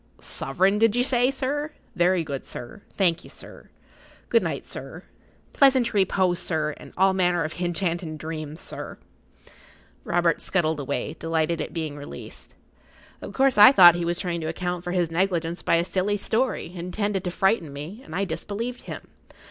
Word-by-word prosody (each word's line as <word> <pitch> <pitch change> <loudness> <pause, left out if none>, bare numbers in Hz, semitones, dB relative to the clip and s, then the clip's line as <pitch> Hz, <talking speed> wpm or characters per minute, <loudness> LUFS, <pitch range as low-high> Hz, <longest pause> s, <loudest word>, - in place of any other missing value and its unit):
"Soverin' 190 +9 0
did 225 0 +4
you 245 - +3
say, 250 -1 +2
sir? 290 +3 -2 0.2
Very 175 0 +3
good, 140 -3 -5
sir. 120 - -8
Thank 175 -4 +1
ye, - - -13
sir. - - -12 0.6
Good 465 - +4
night, - - -3
sir. - - -8 0.5
Pleasant 260 -4 +4
reepose, 190 -3 +2
sir, 155 -3 -1
and - - -12
all 190 +1 +4
manner 180 -2 +2
of 155 - -4
hinchantin' 175 -2 -2
dreams, 155 0 -6
sir." - - -7 1.1
Robert 170 -1 +1
scuttled 160 -5 0
away, 140 -2 -3
delighted 165 0 0
at - - -5
being 155 -3 -4
released. 145 - -10 0.7
Of - - -8
course, 265 -4 +3
I 210 +5 +11
thought 175 -10 +9
he 175 0 -2
was 170 0 -1
trying 175 -3 -3
to 155 - -3
account 175 +1 -3
for 175 - -4
his 175 -3 0
negligence 175 -1 0
by - - +2
a 170 +1 +2
silly 195 +3 0
story, 230 -2 -1
intended 190 +2 -2
to - - 0
frighten 180 -3 +1
me, 155 - -8
and 160 - -9
I 200 +2 0
disbelieved 230 +6 -4
him. - - -7
175 Hz, 170 wpm, -25 LUFS, 165-205 Hz, 1.1 s, I